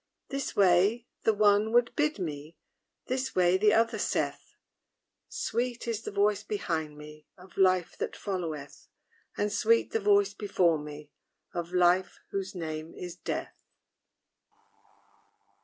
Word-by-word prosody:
This 275 Hz, -1 st, -3 dB
way 200 Hz, +5 st, +4 dB, 0.2 s
the 220 Hz, -, +6 dB
one 210 Hz, +1 st, +4 dB
would 240 Hz, -1 st, +3 dB
bid 300 Hz, +1 st, +1 dB
me; 155 Hz, -3 st, -6 dB, 0.5 s
This 260 Hz, +1 st, -2 dB
way 180 Hz, 0 st, +4 dB
the 210 Hz, +2 st, +4 dB
other 225 Hz, 0 st, +2 dB
saith: -, -, -2 dB, 0.7 s
Sweet 240 Hz, +1 st, -2 dB
is 225 Hz, -2 st, -2 dB
the -, -, -5 dB
voice 205 Hz, 0 st, +2 dB
behind 160 Hz, -8 st, -3 dB
me 150 Hz, 0 st, -12 dB
Of 180 Hz, +1 st, -16 dB
LIFE 185 Hz, -2 st, +2 dB
that -, -, -3 dB
followeth; 165 Hz, -8 st, -5 dB, 0.5 s
And 205 Hz, 0 st, 0 dB
sweet 230 Hz, +2 st, +3 dB
the 225 Hz, -, +1 dB
voice 200 Hz, -1 st, +3 dB
before 180 Hz, -6 st, +1 dB
me 150 Hz, 0 st, -9 dB, 0.4 s
Of 175 Hz, -1 st, -4 dB
LIFE 180 Hz, +1 st, +2 dB
whose 195 Hz, 0 st, -4 dB
name 160 Hz, -1 st, -5 dB
is 180 Hz, -1 st, -7 dB
DEATH. -, -, -4 dB
195 Hz, 130 wpm, -29 LUFS, 170-215 Hz, 0.7 s, the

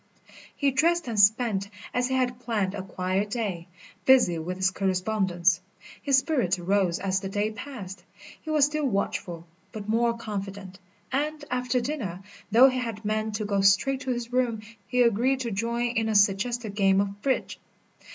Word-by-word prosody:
He 280 Hz, -1 st, +1 dB
dressed 335 Hz, +4 st, +2 dB
and 225 Hz, -3 st, -2 dB
spent, 205 Hz, -1 st, +3 dB, 0.2 s
as 250 Hz, 0 st, +1 dB
he 260 Hz, -, -1 dB
had 250 Hz, -1 st, 0 dB
planned, 215 Hz, -6 st, -1 dB
a 205 Hz, -, -4 dB
quiet 185 Hz, +2 st, -2 dB
day, 200 Hz, -7 st, -3 dB, 0.4 s
busy 245 Hz, -11 st, +5 dB
with 180 Hz, +3 st, -4 dB
his 190 Hz, 0 st, +2 dB
correspondence. 185 Hz, -2 st, +1 dB, 0.4 s
His 275 Hz, -2 st, +3 dB
spirits 265 Hz, -, +1 dB
rose 180 Hz, -1 st, +1 dB
as 190 Hz, 0 st, -1 dB
the 195 Hz, -, -5 dB
day 205 Hz, +2 st, -1 dB
passed. 205 Hz, -6 st, -8 dB, 0.4 s
He 315 Hz, -, -9 dB
was 305 Hz, -2 st, +4 dB
still 300 Hz, 0 st, -1 dB
watchful, 180 Hz, -5 st, -2 dB, 0.3 s
but 210 Hz, -2 st, -7 dB
more 235 Hz, +1 st, +1 dB
confident; 200 Hz, -3 st, -6 dB, 0.3 s
and, 295 Hz, +2 st, -2 dB
after 250 Hz, 0 st, 0 dB
dinner, 235 Hz, -, -4 dB, 0.3 s
though 240 Hz, +5 st, +8 dB
he 255 Hz, 0 st, -2 dB
had 225 Hz, -3 st, -5 dB
meant 215 Hz, 0 st, -1 dB
to 215 Hz, -, -2 dB
go 200 Hz, -1 st, 0 dB
straight 215 Hz, +8 st, +3 dB
to 265 Hz, -, -5 dB
his 240 Hz, -1 st, -3 dB
room, 240 Hz, -4 st, 0 dB, 0.2 s
he 250 Hz, +3 st, +3 dB
agreed 245 Hz, +4 st, +2 dB
to 235 Hz, -2 st, -3 dB
join 235 Hz, +4 st, -1 dB
in 225 Hz, -2 st, -1 dB
a 215 Hz, -, 0 dB
suggested 205 Hz, +3 st, +2 dB
game 195 Hz, -1 st, +3 dB
of 200 Hz, 0 st, -2 dB
bridge. 265 Hz, -2 st, -1 dB
215 Hz, 170 wpm, -26 LUFS, 195-250 Hz, 0.4 s, though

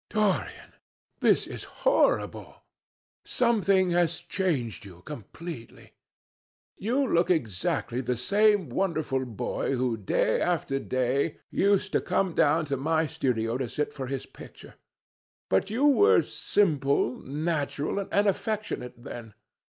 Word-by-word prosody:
"Dorian, 210 Hz, -3 st, -1 dB, 0.5 s
this -, -, +3 dB
is -, -, -7 dB, 0.2 s
horrible! -, -, +1 dB, 0.6 s
Something 200 Hz, -6 st, +2 dB
has 170 Hz, -1 st, +2 dB
changed 170 Hz, -, -2 dB
you 90 Hz, -3 st, -13 dB
completely. 150 Hz, 0 st, -9 dB, 0.8 s
You 250 Hz, +8 st, 0 dB
look 170 Hz, -4 st, +2 dB
exactly 120 Hz, -, -1 dB
the 125 Hz, -1 st, -1 dB
same 200 Hz, -, +2 dB
wonderful 150 Hz, -4 st, -1 dB
boy 120 Hz, +3 st, -2 dB
who, 125 Hz, -2 st, 0 dB
day 105 Hz, +1 st, +1 dB
after 160 Hz, -6 st, 0 dB
day, 130 Hz, +4 st, 0 dB
used 200 Hz, -1 st, +2 dB
to -, -, +2 dB
come 190 Hz, -3 st, 0 dB
down 155 Hz, +2 st, +3 dB
to 140 Hz, -2 st, -2 dB
my 160 Hz, +4 st, +1 dB
studio 120 Hz, -4 st, -1 dB
to 130 Hz, -3 st, -2 dB
sit 150 Hz, +4 st, -2 dB
for 130 Hz, -2 st, -5 dB
his 135 Hz, 0 st, -4 dB
picture. -, -, -13 dB, 0.8 s
But 95 Hz, -, +2 dB
you 240 Hz, +7 st, +1 dB
were 410 Hz, +11 st, +5 dB
simple, 140 Hz, -, +1 dB
natural, 150 Hz, +3 st, -2 dB
and 200 Hz, +1 st, +1 dB
affectionate 200 Hz, -, -3 dB
then. 120 Hz, -6 st, -9 dB
155 Hz, 120 wpm, -27 LUFS, 125-195 Hz, 0.8 s, were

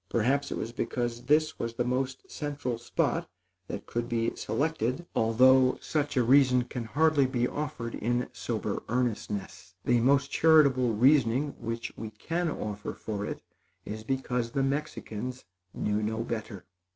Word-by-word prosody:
Perhaps 135 Hz, +5 st, +1 dB
it -, -, -2 dB
was 115 Hz, -, -4 dB
because 120 Hz, 0 st, -3 dB
this 155 Hz, +2 st, +2 dB
was 115 Hz, 0 st, -3 dB
the 120 Hz, -, 0 dB
most 130 Hz, +1 st, -1 dB
central 145 Hz, -5 st, -3 dB
spot -, -, -1 dB, 0.4 s
that -, -, -6 dB
could 120 Hz, 0 st, -3 dB
be 115 Hz, -1 st, 0 dB
selected, 155 Hz, 0 st, -1 dB
although 130 Hz, +3 st, +5 dB
such 150 Hz, -2 st, -2 dB
a 125 Hz, -, +5 dB
reason 125 Hz, 0 st, +5 dB
can 120 Hz, -1 st, -5 dB
hardly 145 Hz, +2 st, +3 dB
be 125 Hz, -2 st, 0 dB
offered 125 Hz, -6 st, -4 dB
in 120 Hz, +2 st, -1 dB
sober -, -, -3 dB
earnestness. 105 Hz, -6 st, -3 dB
The 120 Hz, -1 st, +4 dB
most 140 Hz, +3 st, +3 dB
charitable 140 Hz, -7 st, +5 dB
reasoning 130 Hz, +2 st, +4 dB
which 115 Hz, +1 st, -4 dB
we 110 Hz, -, -6 dB
can 165 Hz, +11 st, -2 dB
offer 105 Hz, -7 st, -4 dB
for 105 Hz, -2 st, -4 dB
it, -, -, -6 dB, 0.4 s
is 110 Hz, +1 st, -6 dB
because 125 Hz, -1 st, -1 dB
the 135 Hz, +3 st, 0 dB
Mexicans 130 Hz, -4 st, -3 dB, 0.3 s
knew 105 Hz, +2 st, -1 dB
no 110 Hz, +2 st, -1 dB
better. 110 Hz, -4 st, -5 dB
125 Hz, 150 wpm, -29 LUFS, 115-140 Hz, 0.4 s, although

